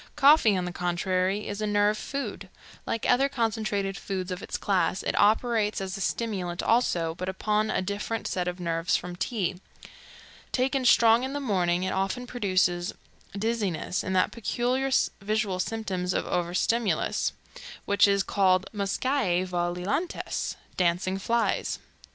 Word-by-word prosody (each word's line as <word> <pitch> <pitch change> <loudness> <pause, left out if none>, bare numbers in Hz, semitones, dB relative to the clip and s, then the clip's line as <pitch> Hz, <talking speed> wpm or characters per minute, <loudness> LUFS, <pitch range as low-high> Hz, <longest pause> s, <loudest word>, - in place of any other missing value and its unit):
Coffee, 280 -8 +6
on 180 - -1
the 180 - -3
contrary, 185 +3 -1
is 205 +1 -4
a 215 - 0
nerve 205 0 +3
food. 215 -5 -5 0.4
Like 230 - -1
other 270 +3 +4
concentrated 215 -6 -1
foods 190 -2 -4
of 180 +1 -4
its - - -4
class, 190 -1 0
it - - -1
operates 215 0 +2
as 190 -1 -4
a 195 - -6
stimulant 190 -6 -2
also, 175 -9 +2
but 185 +2 -4
upon 210 +3 0
a 185 - 0
different 205 +3 -3
set 180 -1 -2
of 180 0 -3
nerves 165 -1 0
from 180 0 -7
tea. 185 -1 -2 0.9
Taken 260 +1 0
strong 230 -1 +6
in 265 +1 -3
the 285 - -2
morning, 180 -8 +1
it 190 - -1
often 195 +6 -1
produces 185 -7 0 0.4
dizziness 205 -5 -1
and 190 - -2
that 185 - +3
peculiar 245 +3 -1 0.3
visual 205 -2 -1
symptom 190 -3 -2
of 180 - 0
overstimulus 180 +6 0 0.5
which 200 0 +4
is 200 -1 +2
called 185 -2 +2
muscae 200 -2 0
volilantes 180 - -2 0.2
dancing 180 +2 +1
flies. 230 +3 0
200 Hz, 145 wpm, -27 LUFS, 180-225 Hz, 0.9 s, Coffee